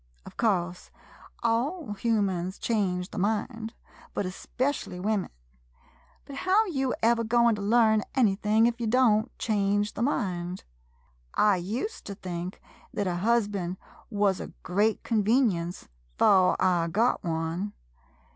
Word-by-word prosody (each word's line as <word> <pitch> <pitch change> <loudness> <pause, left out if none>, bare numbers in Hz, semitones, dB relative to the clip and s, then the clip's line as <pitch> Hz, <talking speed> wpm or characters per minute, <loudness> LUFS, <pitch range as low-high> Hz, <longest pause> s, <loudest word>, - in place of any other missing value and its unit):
Of - - -11
course, 180 -6 0 0.5
all 240 - 0
humans 195 -4 0
change 185 -5 -1
the 210 - -4
mind, 220 +3 -2 0.4
but - - -1
specially 250 -7 -3
women 205 0 -1 0.5
— - - -32
but 275 - -8
how 385 +8 +3
you 270 -9 -1
ever 230 0 +3
goin' 235 +1 +3
to 210 - -4
learn 220 0 +4
anything 215 -2 +3
if 240 0 0
ye 230 - 0
don't 225 -1 +3
change 205 -1 0
the - - -5
mind? 185 -8 -1 0.7
I 205 -3 +4
ust 230 - -4
to 200 - -5
think 180 -1 -6 0.3
thet 205 - -2
a 180 -2 -1
husband 200 -3 0 0.3
wuz 205 -3 +1
a - - -5 0.2
great 205 +4 +1
convenience 210 -6 +1 0.2
— - - -37
'fore 185 -2 +4
I 175 -3 +2
got 220 +9 +1
one. 165 +4 -2
210 Hz, 135 wpm, -27 LUFS, 185-230 Hz, 0.7 s, learn